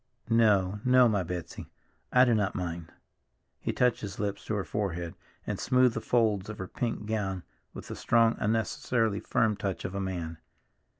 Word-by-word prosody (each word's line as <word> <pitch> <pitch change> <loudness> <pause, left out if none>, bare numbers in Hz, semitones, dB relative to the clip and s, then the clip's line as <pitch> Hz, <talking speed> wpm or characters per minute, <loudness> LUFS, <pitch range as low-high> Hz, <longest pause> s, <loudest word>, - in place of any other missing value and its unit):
"No. 105 -4 +3
No, 125 -1 +6
my 105 -4 +1
Betsy, 85 -1 -6 0.4
I 125 0 +6
do 120 - +3
not 105 -3 0
mind." 85 -2 -4 0.7
He - - -2
touched 125 -1 +2
his 100 -1 -6
lips 100 -1 -3
to 110 - -2
her 100 - -1
forehead, 90 -5 -3 0.3
and - - -3
smoothed 125 -2 +3
the 115 - -2
folds 110 -5 +1
of 105 - -6
her 95 - -5
pink 115 -1 -3
gown 100 -4 -2 0.3
with - - -8
the - - -6
strong, 115 -1 +3
unnecessarily 110 0 0
firm 110 -2 +1
touch 95 -2 -3
of 90 - -4
a 100 - -2
man. 85 -4 -4
105 Hz, 175 wpm, -29 LUFS, 95-115 Hz, 0.7 s, No